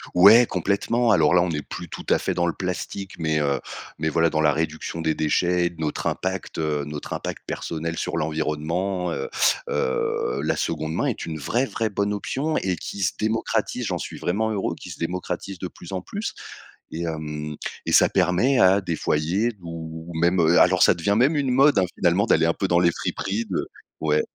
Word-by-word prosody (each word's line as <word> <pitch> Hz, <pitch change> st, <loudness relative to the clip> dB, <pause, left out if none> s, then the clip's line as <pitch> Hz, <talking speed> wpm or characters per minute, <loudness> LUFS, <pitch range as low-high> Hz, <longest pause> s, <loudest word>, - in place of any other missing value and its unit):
Ouais, 105 Hz, +7 st, +8 dB
complètement. 100 Hz, +6 st, +1 dB
Alors 85 Hz, -4 st, +4 dB
là, 90 Hz, -, +6 dB
on 90 Hz, -, 0 dB
est 75 Hz, -2 st, -2 dB
plus 85 Hz, +4 st, -8 dB
tout -, -, -8 dB
à -, -, +5 dB
fait -, -, -2 dB
dans 85 Hz, 0 st, 0 dB
le 85 Hz, -, 0 dB
plastique, 95 Hz, +1 st, -4 dB
mais 80 Hz, -2 st, +1 dB
heu, 70 Hz, -2 st, +1 dB, 0.4 s
mais 80 Hz, 0 st, 0 dB
voilà, 85 Hz, +1 st, +3 dB
dans 80 Hz, 0 st, 0 dB
la 75 Hz, -, +4 dB
réduction 80 Hz, +1 st, -3 dB
des 80 Hz, -1 st, +1 dB
déchets 90 Hz, +3 st, +1 dB
et -, -, +1 dB
de 85 Hz, -, -17 dB
notre 75 Hz, -, -2 dB
impact, 95 Hz, 0 st, -3 dB
heu, 75 Hz, -2 st, -1 dB
notre 75 Hz, -1 st, -6 dB
impact -, -, -5 dB
personnel 80 Hz, 0 st, -4 dB
sur -, -, -2 dB
l'environnement, 80 Hz, +4 st, -1 dB
heu 70 Hz, -, -3 dB, 0.4 s
heu, 65 Hz, -1 st, -1 dB
la -, -, +1 dB
2de 80 Hz, -1 st, -2 dB
main -, -, 0 dB
est -, -, -2 dB
une 80 Hz, -1 st, -4 dB
vraie, 120 Hz, -, 0 dB
vraie 115 Hz, -4 st, -2 dB
bonne 100 Hz, 0 st, -1 dB
option 145 Hz, +9 st, -2 dB
et 95 Hz, -1 st, 0 dB
qui 100 Hz, +4 st, -7 dB
se 85 Hz, -, +1 dB
démocratise, 110 Hz, +1 st, -1 dB
j'en -, -, -1 dB
suis -, -, -6 dB
vraiment 110 Hz, +5 st, 0 dB
heureux, 100 Hz, -3 st, -1 dB
qui -, -, -9 dB
se -, -, -9 dB
démocratise 90 Hz, +2 st, -4 dB
de 90 Hz, -, -3 dB
plus 90 Hz, +1 st, -12 dB
en 95 Hz, -, -3 dB
plus 205 Hz, -, -5 dB, 0.6 s
et 80 Hz, -, -4 dB
hem, 75 Hz, -2 st, -4 dB, 0.3 s
et -, -, -2 dB
ça -, -, +6 dB
permet 95 Hz, +9 st, +2 dB
à 95 Hz, +1 st, +6 dB
des 85 Hz, -3 st, -2 dB
foyers 90 Hz, +13 st, 0 dB
ou 80 Hz, 0 st, -7 dB
même, 85 Hz, +3 st, +2 dB
heu, 85 Hz, +1 st, +5 dB
alors -, -, +5 dB
ça -, -, +6 dB
devient 100 Hz, +5 st, 0 dB
même 135 Hz, +7 st, +4 dB
une 140 Hz, -3 st, +1 dB
mode, 135 Hz, -2 st, +5 dB
hein, 95 Hz, -, +3 dB
finalement, 90 Hz, +4 st, +3 dB
d'aller 80 Hz, -, +4 dB
un 85 Hz, -, +2 dB
peu 95 Hz, -, -1 dB
dans 85 Hz, -1 st, +3 dB
les 85 Hz, -1 st, +4 dB
friperies 105 Hz, +7 st, -3 dB
de -, -, -1 dB, 0.3 s
ouais, 75 Hz, -1 st, +2 dB
85 Hz, 210 wpm, -24 LUFS, 80-100 Hz, 0.6 s, Ouais